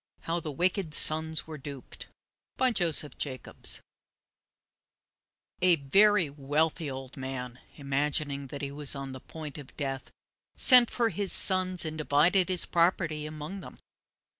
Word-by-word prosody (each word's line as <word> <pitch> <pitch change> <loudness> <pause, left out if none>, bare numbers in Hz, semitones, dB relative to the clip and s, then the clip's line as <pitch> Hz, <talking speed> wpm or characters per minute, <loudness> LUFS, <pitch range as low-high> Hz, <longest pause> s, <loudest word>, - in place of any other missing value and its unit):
HOW 170 +1 -2
THE 155 -2 -5
WICKED 175 +1 0
SONS 160 0 +4
WERE 155 -2 -9
DUPED 140 -1 -9 0.5
By 260 -1 +2
Joseph 165 -7 0
Jacobs 130 -4 -3 1.8
A 180 -1 +5
very 185 +5 +3
wealthy 150 +3 -1
old 130 0 -8
man, 130 -2 -6 0.2
imagining 140 0 -1
that 140 +2 -8
he 140 - -4
was 145 0 -2
on 135 -1 -6
the 130 - -8
point 155 -2 -9
of 140 - -14
death, 135 -2 -4 0.5
sent 250 -3 +7
for 235 -2 0
his 200 0 -3
sons 185 -3 +1
and 155 0 -5
divided 170 +6 +3
his 180 -2 +2
property 170 -3 +1
among 155 +5 -7
them. - - -11
155 Hz, 140 wpm, -28 LUFS, 140-175 Hz, 1.8 s, sent